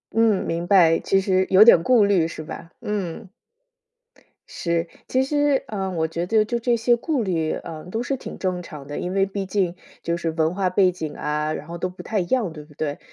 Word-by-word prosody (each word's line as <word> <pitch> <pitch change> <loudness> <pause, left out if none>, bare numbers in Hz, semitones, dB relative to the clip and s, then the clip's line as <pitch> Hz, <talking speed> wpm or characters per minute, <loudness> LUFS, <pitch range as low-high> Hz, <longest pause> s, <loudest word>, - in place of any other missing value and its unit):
嗯， 225 -4 +3
明 170 +1 -2
白， 170 -4 +5
其 195 - +2
实 185 -1 +1
有 195 +3 +8
点 195 -7 +7
顾 225 +1 +4
虑 185 -5 +3
是 160 -1 -7
吧？ 165 - -9
嗯。 205 -2 -4 1.2
是， 170 -1 -2 0.2
其 260 +1 +2
实， 290 -1 +1
嗯， 190 -3 -3
我 160 -1 0
觉 170 +2 -3
得 220 0 +3
就 235 +2 -2
这 240 0 +1
些 235 +1 +3
顾 275 -2 -1
虑， 165 -5 -1
啊， 160 -2 -7
都 225 +5 -2
是 270 +2 -2
挺 - - -8
正 180 -2 -2
常 150 -5 -10
的。 145 - -5
因 180 - -3
为 195 0 +3
毕 195 0 -4
竟 185 -2 -1 0.3
就 170 0 -1
是 165 -1 -2
文 160 +1 0
化 190 -1 0
背 185 0 +3
景 160 -4 -6
啊， 150 +1 -2
然 150 - -7
后 170 +1 -6
都 185 +2 -2
不 180 - -11
太 215 - -1
一 180 - -1
样， 220 -2 0
对 150 -2 -10
不 150 - -19
对？ 145 -1 -3
185 Hz, 240 characters per minute, -23 LUFS, 165-215 Hz, 1.2 s, 有